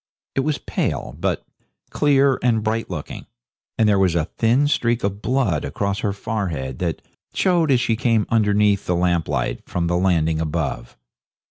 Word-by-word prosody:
It -, -, -1 dB
was 145 Hz, +2 st, 0 dB
pale, -, -, -3 dB
but -, -, -1 dB, 0.5 s
clear 140 Hz, -2 st, +3 dB
and 115 Hz, -3 st, +2 dB
bright 110 Hz, +1 st, -1 dB
looking, 80 Hz, -5 st, -7 dB, 0.5 s
and 110 Hz, -, +3 dB
there 100 Hz, -2 st, +3 dB
was 90 Hz, -3 st, +2 dB
a 80 Hz, -2 st, +1 dB
thin 120 Hz, -, +1 dB
streak 120 Hz, -4 st, +1 dB
of 100 Hz, +1 st, -2 dB
blood 110 Hz, -, 0 dB
across 100 Hz, +7 st, -2 dB
her 105 Hz, -, -1 dB
forehead 95 Hz, -, -4 dB
that 85 Hz, -3 st, -2 dB, 0.3 s
showed 175 Hz, -4 st, +2 dB
as 130 Hz, -3 st, +4 dB
she 115 Hz, -2 st, +1 dB
came 115 Hz, -2 st, +1 dB
underneath 105 Hz, -2 st, +2 dB
the 90 Hz, -, +1 dB
lamp 85 Hz, -2 st, +1 dB
light -, -, -2 dB
from 85 Hz, -1 st, -1 dB
the 85 Hz, +1 st, +1 dB
landing 80 Hz, -4 st, +1 dB
above. 75 Hz, -6 st, -3 dB
105 Hz, 165 wpm, -21 LUFS, 85-120 Hz, 0.5 s, as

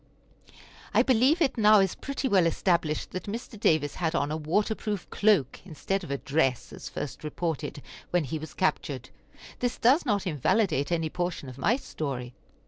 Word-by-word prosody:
I -, -, +6 dB
believe 265 Hz, +7 st, +4 dB
it 265 Hz, -5 st, 0 dB
now 215 Hz, 0 st, +7 dB
is 195 Hz, -2 st, +2 dB
pretty 275 Hz, 0 st, -3 dB
well 190 Hz, -7 st, +4 dB
established 165 Hz, -2 st, 0 dB
that 185 Hz, -, -5 dB
Mr. 220 Hz, +1 st, -6 dB
Davis 155 Hz, -6 st, +2 dB
had 165 Hz, -1 st, -1 dB
on 145 Hz, -3 st, 0 dB
a -, -, -1 dB
water 165 Hz, +8 st, 0 dB
proof 210 Hz, -4 st, -4 dB
cloak 195 Hz, -, +2 dB
instead 195 Hz, +3 st, -3 dB
of 170 Hz, -, -8 dB
a 140 Hz, -, -1 dB
dress, 135 Hz, -3 st, 0 dB
as -, -, -8 dB
first 145 Hz, -, -6 dB
reported, 150 Hz, -2 st, -3 dB, 0.3 s
when 175 Hz, -2 st, +2 dB
he 155 Hz, +3 st, -4 dB
was 155 Hz, -1 st, -9 dB
captured. 140 Hz, -8 st, -1 dB, 0.5 s
This 245 Hz, 0 st, -1 dB
does 260 Hz, +8 st, +4 dB
not 205 Hz, -7 st, 0 dB
invalidate 160 Hz, -, +1 dB
any 165 Hz, -2 st, 0 dB
portion 175 Hz, -6 st, -3 dB
of 130 Hz, +1 st, -11 dB
my 220 Hz, -, +3 dB
story. 135 Hz, -, -5 dB
175 Hz, 175 wpm, -28 LUFS, 150-210 Hz, 0.5 s, now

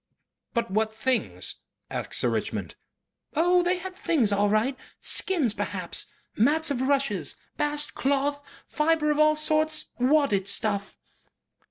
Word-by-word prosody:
"But 235 Hz, -5 st, 0 dB
what 220 Hz, +2 st, +1 dB
things?" 230 Hz, +3 st, -2 dB, 0.3 s
asked -, -, -4 dB
Sir -, -, +2 dB
Richmond. -, -, -3 dB, 0.6 s
"Oh! 355 Hz, +3 st, +4 dB
they 355 Hz, +1 st, +1 dB
had 370 Hz, +1 st, -7 dB
things 310 Hz, -, +1 dB
all 205 Hz, +1 st, +2 dB
right. 220 Hz, +6 st, +1 dB, 0.2 s
Skins 310 Hz, -, +2 dB
perhaps. -, -, -4 dB, 0.3 s
Mats 300 Hz, +7 st, +3 dB
of 255 Hz, -3 st, -1 dB
rushes. 275 Hz, +1 st, 0 dB, 0.2 s
Bast 295 Hz, 0 st, -1 dB
cloth. 285 Hz, +1 st, 0 dB, 0.2 s
Fibre 300 Hz, 0 st, +1 dB
of 300 Hz, -, 0 dB
all 305 Hz, 0 st, +5 dB
sorts. 310 Hz, 0 st, +1 dB
Wadded 250 Hz, -7 st, +2 dB
stuff." 200 Hz, 0 st, 0 dB
285 Hz, 130 wpm, -26 LUFS, 225-310 Hz, 0.6 s, all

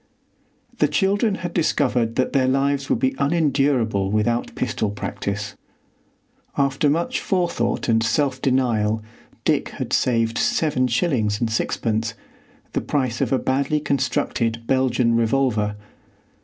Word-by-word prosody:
The -, -, +4 dB
children 200 Hz, +2 st, +1 dB
had 175 Hz, -, -4 dB
discovered 125 Hz, -8 st, +1 dB
that 130 Hz, -, 0 dB
their 130 Hz, -2 st, +3 dB
lives 135 Hz, +1 st, +1 dB
would -, -, +2 dB
be 265 Hz, 0 st, +1 dB
unendurable 140 Hz, -, +1 dB
without 110 Hz, +3 st, 0 dB
pistol 110 Hz, -3 st, -1 dB
practice. 105 Hz, 0 st, -4 dB, 1.0 s
After 140 Hz, +1 st, +2 dB
much 170 Hz, -, 0 dB
forethought 170 Hz, -, -1 dB
and 115 Hz, -1 st, +3 dB
self 130 Hz, +2 st, 0 dB
denial, 115 Hz, -5 st, +1 dB, 0.4 s
Dick -, -, +1 dB
had -, -, -5 dB
saved 115 Hz, -2 st, +1 dB
seven 140 Hz, -5 st, +1 dB
shillings 115 Hz, -, 0 dB
and 115 Hz, -2 st, -1 dB
sixpence, 115 Hz, 0 st, -1 dB, 0.6 s
the -, -, 0 dB
price 130 Hz, -5 st, -1 dB
of -, -, 0 dB
a 135 Hz, -, +3 dB
badly 140 Hz, +4 st, 0 dB
constructed 130 Hz, -5 st, -1 dB
Belgian 125 Hz, -2 st, +2 dB
revolver. 115 Hz, -3 st, +1 dB
130 Hz, 125 wpm, -22 LUFS, 115-140 Hz, 1.0 s, The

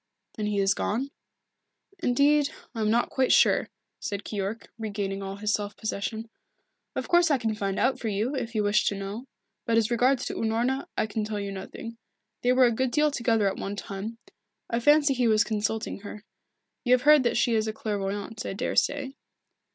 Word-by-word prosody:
"Then 210 Hz, -1 st, -2 dB
he 210 Hz, -1 st, -1 dB
is 195 Hz, -1 st, +3 dB
gone?" 255 Hz, +10 st, -2 dB, 0.9 s
"Indeed, 285 Hz, +3 st, +3 dB, 0.2 s
I 225 Hz, -, -4 dB
am 215 Hz, -, +2 dB
not 235 Hz, +2 st, +2 dB
quite 265 Hz, -1 st, +2 dB
sure," -, -, +4 dB, 0.3 s
said 200 Hz, -1 st, -4 dB
Keyork, 205 Hz, +2 st, -4 dB
regaining 200 Hz, -2 st, -3 dB
all 195 Hz, 0 st, -5 dB
his 210 Hz, +1 st, -1 dB
self 205 Hz, 0 st, -2 dB
possession. 220 Hz, +1 st, -3 dB, 0.7 s
"Of -, -, -3 dB
course 345 Hz, -1 st, +4 dB
I 285 Hz, -, +4 dB
can 225 Hz, -3 st, -1 dB
find 200 Hz, -2 st, -2 dB
out 260 Hz, -1 st, +1 dB
for 230 Hz, -, -3 dB
you, 215 Hz, +6 st, -1 dB
if 240 Hz, -3 st, -4 dB
you 215 Hz, -, +2 dB
wish 205 Hz, +1 st, +2 dB
to 200 Hz, -, +1 dB
know. 200 Hz, +6 st, -6 dB, 0.4 s
But 230 Hz, -1 st, +3 dB
as 225 Hz, 0 st, +2 dB
regards 250 Hz, +2 st, +2 dB
Unorna, 235 Hz, +5 st, -1 dB
I -, -, +2 dB
can 215 Hz, 0 st, -3 dB
tell 210 Hz, -1 st, -3 dB
you 200 Hz, -1 st, -4 dB
nothing. 225 Hz, +4 st, -8 dB, 0.4 s
They 245 Hz, -, +3 dB
were 255 Hz, 0 st, +6 dB
a 240 Hz, -, +4 dB
good 260 Hz, +3 st, 0 dB
deal 300 Hz, +3 st, +2 dB
together 230 Hz, -5 st, +1 dB
at 195 Hz, -, -1 dB
one 200 Hz, +1 st, -4 dB
time. 200 Hz, +3 st, -6 dB, 0.5 s
I 235 Hz, -, +1 dB
fancy 295 Hz, +2 st, +5 dB
he 250 Hz, -2 st, +1 dB
was 215 Hz, -1 st, +4 dB
consulting 220 Hz, 0 st, -2 dB
her. 205 Hz, +1 st, -9 dB, 0.6 s
You 250 Hz, -1 st, +4 dB
have 250 Hz, 0 st, +3 dB
heard 300 Hz, 0 st, +7 dB
that 240 Hz, -, +1 dB
she 235 Hz, -, +2 dB
is 220 Hz, -1 st, +1 dB
a -, -, 0 dB
clairvoyant, 205 Hz, 0 st, -3 dB
I -, -, -4 dB
daresay." 265 Hz, +5 st, 0 dB
225 Hz, 195 wpm, -27 LUFS, 205-250 Hz, 0.9 s, heard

